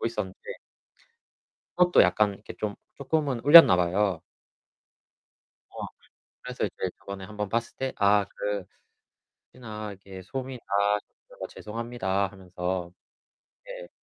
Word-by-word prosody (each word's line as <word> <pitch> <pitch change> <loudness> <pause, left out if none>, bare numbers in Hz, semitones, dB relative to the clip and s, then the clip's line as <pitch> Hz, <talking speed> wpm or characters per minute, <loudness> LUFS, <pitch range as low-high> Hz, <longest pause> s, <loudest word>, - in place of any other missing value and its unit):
있었는데 105 -5 -4 1.2
그것도 180 0 +6
약간 100 +3 +3
이렇게 105 - -11
좀 105 -1 -2 0.2
조금은 140 -3 -1
울렸나봐요. 95 - +7 1.5
어. - - -5 0.6
그래서 - - -3
이제 - - -3
저번에 100 -1 -8
1 105 +3 -11
번 105 -1 -2
봤을 115 +2 -2
때 130 0 -2
"아 100 0 +4
그 100 0 -4 0.9
혹시나 110 -4 -7
이렇게 95 -1 -11
소음이 130 +5 -6
나서 100 +1 -2
죄송합니다" 105 -3 -2
하면서. 90 -2 -4 0.7
네. - - -9
105 Hz, 240 characters per minute, -27 LUFS, 95-120 Hz, 1.5 s, 울렸나봐요